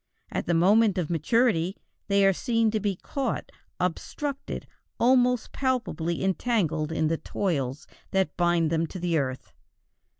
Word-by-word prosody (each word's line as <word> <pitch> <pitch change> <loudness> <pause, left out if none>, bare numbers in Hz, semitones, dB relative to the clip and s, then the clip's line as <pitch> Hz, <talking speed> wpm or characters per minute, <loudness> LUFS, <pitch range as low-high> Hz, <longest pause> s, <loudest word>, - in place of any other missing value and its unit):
At - - -3
the 170 - +2
moment 200 +4 +4
of 175 -3 -1
maturity 185 - +2 0.3
they 200 0 +4
are 195 - +5
seen 230 +2 +1
to 215 - 0
be 205 -2 -1
caught, 260 +6 -3 0.3
obstructed, 270 - -3 0.3
almost 250 -1 +3
palpably 235 -11 -1
entangled 185 -6 0
in 160 -1 +1
the 165 +1 0
toils 145 -10 -2 0.2
that 190 -5 0
bind 175 -2 +2
them 165 0 +1
to 175 0 -2
earth. 130 -4 -2
185 Hz, 135 wpm, -27 LUFS, 165-230 Hz, 0.3 s, are